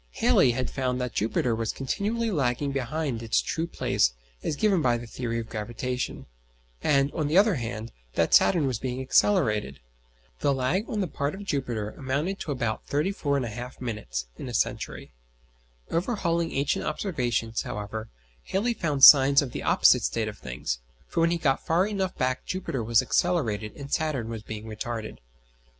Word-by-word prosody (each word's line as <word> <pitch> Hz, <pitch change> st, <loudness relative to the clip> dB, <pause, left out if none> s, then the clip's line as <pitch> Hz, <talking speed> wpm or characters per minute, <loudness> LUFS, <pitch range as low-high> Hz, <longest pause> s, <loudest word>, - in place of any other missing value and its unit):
Halley 125 Hz, -, +4 dB
had 125 Hz, +1 st, -2 dB
found 130 Hz, -2 st, -1 dB
that 125 Hz, -2 st, -3 dB
Jupiter 115 Hz, +2 st, 0 dB
was 110 Hz, 0 st, -1 dB
continually 215 Hz, -, -2 dB
lagging 140 Hz, -3 st, 0 dB
behind 135 Hz, -1 st, -2 dB
its 115 Hz, -1 st, +1 dB
true 165 Hz, +1 st, -2 dB
place -, -, +1 dB, 0.3 s
as -, -, -2 dB
given 195 Hz, +1 st, +2 dB
by 120 Hz, -4 st, +2 dB
the 120 Hz, -, -8 dB
theory 115 Hz, 0 st, -4 dB
of 115 Hz, -1 st, -4 dB
gravitation; 120 Hz, +3 st, -4 dB, 0.6 s
and, 140 Hz, -1 st, +2 dB
on 155 Hz, -3 st, -1 dB
the 155 Hz, +5 st, +2 dB
other 205 Hz, +1 st, +6 dB
hand, 115 Hz, -4 st, -4 dB, 0.2 s
that -, -, +1 dB
Saturn 170 Hz, -6 st, +5 dB
was 130 Hz, -4 st, -1 dB
being 130 Hz, -1 st, -3 dB
accelerated. 120 Hz, -, +2 dB, 0.6 s
The 140 Hz, -1 st, +2 dB
lag 145 Hz, -, 0 dB
on 210 Hz, -, -1 dB
the 190 Hz, -, 0 dB
part 140 Hz, 0 st, -2 dB
of 200 Hz, -, -8 dB
Jupiter 120 Hz, -, -2 dB
amounted 145 Hz, +8 st, -2 dB
to 150 Hz, -, -4 dB
about 115 Hz, -5 st, -2 dB
34 145 Hz, -2 st, 0 dB
1/2 120 Hz, +2 st, -6 dB
minutes 105 Hz, -, -4 dB
in -, -, -5 dB
a -, -, -4 dB
century. -, -, -2 dB, 0.8 s
Overhauling 170 Hz, -3 st, 0 dB
ancient 140 Hz, +1 st, 0 dB
observations, 120 Hz, -, -1 dB
however, 105 Hz, +2 st, -5 dB, 0.4 s
Halley 230 Hz, +5 st, 0 dB
found 150 Hz, -10 st, -2 dB
signs 140 Hz, 0 st, +9 dB
of 130 Hz, -, -6 dB
the -, -, -5 dB
opposite -, -, +5 dB
state -, -, -1 dB
of -, -, -7 dB
things, 60 Hz, -1 st, -4 dB, 0.3 s
for -, -, -3 dB
when 165 Hz, -, +4 dB
he 170 Hz, -, +1 dB
got 135 Hz, -5 st, +1 dB
far 175 Hz, +3 st, +2 dB
enough 195 Hz, -3 st, -2 dB
back 130 Hz, 0 st, 0 dB
Jupiter 170 Hz, -10 st, -3 dB
was 115 Hz, +1 st, +3 dB
accelerated 115 Hz, -12 st, 0 dB
and 140 Hz, -1 st, -7 dB
Saturn 145 Hz, -8 st, -1 dB
was 115 Hz, -2 st, -5 dB
being 110 Hz, 0 st, -7 dB
retarded. 110 Hz, 0 st, -5 dB
130 Hz, 170 wpm, -27 LUFS, 115-165 Hz, 0.8 s, signs